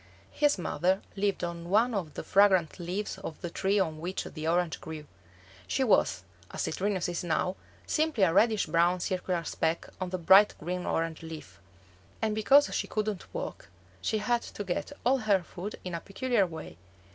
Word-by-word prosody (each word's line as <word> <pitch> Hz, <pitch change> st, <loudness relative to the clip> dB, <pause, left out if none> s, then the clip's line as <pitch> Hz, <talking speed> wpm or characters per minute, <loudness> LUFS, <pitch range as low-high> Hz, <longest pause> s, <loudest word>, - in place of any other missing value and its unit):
His 295 Hz, -4 st, +2 dB
mother 185 Hz, +2 st, 0 dB
lived 200 Hz, -1 st, 0 dB
on 170 Hz, 0 st, -4 dB
one 225 Hz, +5 st, +3 dB
of 175 Hz, -7 st, -3 dB
the -, -, -5 dB
fragrant 190 Hz, -5 st, +4 dB
leaves 190 Hz, +3 st, -3 dB
of 165 Hz, -5 st, -7 dB
the 175 Hz, -, -4 dB
tree 195 Hz, +3 st, +1 dB
on 160 Hz, -5 st, -1 dB
which 180 Hz, +4 st, -3 dB
the 155 Hz, -1 st, -6 dB
orange 170 Hz, 0 st, +1 dB
grew. 155 Hz, -1 st, -7 dB, 0.6 s
She 265 Hz, -, +1 dB
was, 95 Hz, -, +3 dB, 0.3 s
as -, -, -3 dB
Citrinus 190 Hz, +1 st, -1 dB
is 175 Hz, 0 st, -3 dB
now, 175 Hz, +2 st, 0 dB, 0.3 s
simply 310 Hz, -9 st, +1 dB
a 165 Hz, -3 st, +4 dB
reddish 215 Hz, +2 st, +4 dB
brown 170 Hz, +3 st, +2 dB
circular 180 Hz, -1 st, -1 dB
speck 160 Hz, +1 st, -1 dB
on 185 Hz, -, -2 dB
the 185 Hz, -, -2 dB
bright 190 Hz, +4 st, +6 dB
green 180 Hz, +3 st, -4 dB
orange 165 Hz, -1 st, -1 dB
leaf; 155 Hz, -, -9 dB, 0.6 s
and 215 Hz, -1 st, 0 dB
because 270 Hz, +7 st, +5 dB
she -, -, -1 dB
couldn't 215 Hz, -3 st, -3 dB
walk, -, -, -6 dB, 0.3 s
she 220 Hz, -, 0 dB
had 235 Hz, +3 st, +1 dB
to 205 Hz, -, -7 dB
get 185 Hz, +6 st, -3 dB
all 265 Hz, +2 st, +4 dB
her 205 Hz, -5 st, +2 dB
food 185 Hz, +4 st, -7 dB
in 180 Hz, -, -5 dB
a 170 Hz, -, -2 dB
peculiar 220 Hz, -1 st, +1 dB
way. 160 Hz, -, -9 dB
185 Hz, 180 wpm, -29 LUFS, 170-210 Hz, 0.6 s, bright